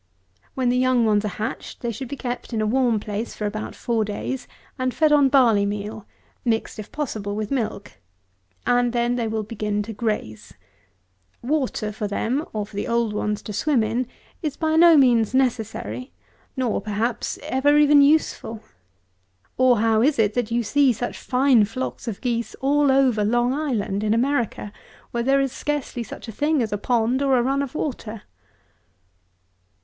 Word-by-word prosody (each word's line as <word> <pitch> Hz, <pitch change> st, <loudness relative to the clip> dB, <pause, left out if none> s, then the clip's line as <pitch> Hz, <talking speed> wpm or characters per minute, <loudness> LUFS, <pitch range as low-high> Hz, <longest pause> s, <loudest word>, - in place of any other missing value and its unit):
When 255 Hz, -2 st, +1 dB
the 250 Hz, +1 st, +2 dB
young 255 Hz, -2 st, +3 dB
ones 210 Hz, -1 st, +2 dB
are 200 Hz, -, -4 dB
hatched, 220 Hz, +2 st, -5 dB
they 235 Hz, -, -2 dB
should 260 Hz, +4 st, -6 dB
be 280 Hz, -, -5 dB
kept 245 Hz, -2 st, -5 dB
in 225 Hz, -, 0 dB
a 215 Hz, -, +1 dB
warm 240 Hz, -1 st, +2 dB
place 210 Hz, +2 st, -5 dB
for 210 Hz, -, -4 dB
about 215 Hz, +1 st, -4 dB
four 230 Hz, -2 st, 0 dB
days, 245 Hz, +5 st, -4 dB, 0.3 s
and 255 Hz, 0 st, 0 dB
fed 310 Hz, -1 st, +3 dB
on 285 Hz, -2 st, +5 dB
barley 240 Hz, -7 st, +4 dB
meal, 205 Hz, +1 st, -4 dB, 0.4 s
mixed, 225 Hz, -2 st, -1 dB
if 215 Hz, -, -8 dB
possible, 215 Hz, -9 st, -3 dB
with 215 Hz, -1 st, -4 dB
milk; 225 Hz, -6 st, -3 dB, 0.7 s
and 245 Hz, -1 st, +2 dB
then 240 Hz, 0 st, +1 dB
they 235 Hz, -2 st, -1 dB
will 220 Hz, 0 st, -2 dB
begin 210 Hz, -1 st, -2 dB
to 225 Hz, +2 st, -7 dB
graze. 205 Hz, -, -4 dB, 0.9 s
Water 255 Hz, -6 st, -1 dB
for 210 Hz, 0 st, -4 dB
them, 240 Hz, +8 st, -1 dB
or 210 Hz, -2 st, -3 dB
for 210 Hz, -, -15 dB
the 205 Hz, -, -3 dB
old 235 Hz, -2 st, 0 dB
ones 210 Hz, 0 st, -2 dB
to 210 Hz, -, -6 dB
swim 255 Hz, +2 st, +2 dB
in, 230 Hz, +3 st, -1 dB, 0.3 s
is 300 Hz, -4 st, -3 dB
by 315 Hz, -1 st, 0 dB
no 335 Hz, -1 st, +7 dB
means 240 Hz, -4 st, +4 dB
necessary, 250 Hz, 0 st, -1 dB, 0.5 s
nor, 245 Hz, -6 st, 0 dB
perhaps, 215 Hz, +4 st, -2 dB
ever 285 Hz, +3 st, +2 dB
even 295 Hz, -1 st, +6 dB
useful. 280 Hz, -6 st, +1 dB, 0.9 s
Or, 255 Hz, -4 st, +4 dB
how 225 Hz, -1 st, +3 dB
is 280 Hz, +4 st, +3 dB
it, 215 Hz, -2 st, +2 dB
that 245 Hz, -3 st, -1 dB
you 235 Hz, +1 st, 0 dB
see 275 Hz, +4 st, +3 dB
such 240 Hz, +2 st, -5 dB
fine 255 Hz, -3 st, +3 dB
flocks 255 Hz, +4 st, -5 dB
of 225 Hz, -, -2 dB
fine -, -, -28 dB
geese 235 Hz, -2 st, -2 dB
all 285 Hz, +1 st, +2 dB
over 260 Hz, -5 st, +3 dB
Long 240 Hz, +4 st, +2 dB
Island 230 Hz, -9 st, -1 dB
(in 215 Hz, +1 st, +2 dB
America) 240 Hz, -4 st, -1 dB, 0.4 s
where 235 Hz, -, -1 dB
there 270 Hz, +3 st, +3 dB
is 270 Hz, -2 st, -1 dB
scarcely 285 Hz, -2 st, -3 dB
such 230 Hz, -, -8 dB
a -, -, -5 dB
thing 295 Hz, +3 st, +1 dB
as 215 Hz, -2 st, -3 dB
a -, -, 0 dB
pond 240 Hz, +3 st, +1 dB
or 270 Hz, -2 st, +3 dB
a 240 Hz, -, +2 dB
run 275 Hz, +2 st, +1 dB
of 280 Hz, +1 st, -5 dB
water? 230 Hz, -8 st, -4 dB
240 Hz, 180 wpm, -23 LUFS, 215-265 Hz, 0.9 s, no